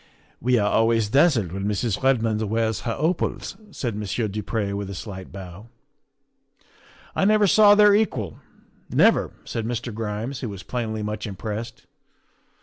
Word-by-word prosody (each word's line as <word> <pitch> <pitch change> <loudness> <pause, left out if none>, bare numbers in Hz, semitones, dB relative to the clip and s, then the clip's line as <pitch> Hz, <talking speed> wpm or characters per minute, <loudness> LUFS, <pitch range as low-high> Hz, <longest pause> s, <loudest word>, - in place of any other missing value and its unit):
' - - -35
We 125 0 +3
are 105 -2 +2
always 115 0 +2
dazzled 135 - +3
when 95 +2 -4
Mrs. 105 0 -1
Redmond 115 -5 +2
wears 110 0 0
her 115 - -2
opals," 165 +5 -1
said 120 - -4
Monsieur 105 +2 -2
du 105 +1 -4
Pre 105 -1 -2
with 100 -1 -4
a 100 - -6
slight 95 -1 -8
bow. 95 +2 -10 0.7
' - - -29
I - - +1
never 210 +1 +4
saw 205 +1 +7
their 210 -1 +7
equal 130 - 0 0.5
never," - - +4 0.2
said 115 -1 -3
Mr. 120 -1 -3
Grimes, 110 +4 -4
who 120 - -4
was 100 -2 -8
plainly 110 -3 -3
much 105 +1 -4
impressed. 105 +3 -6
110 Hz, 160 wpm, -24 LUFS, 105-125 Hz, 0.7 s, saw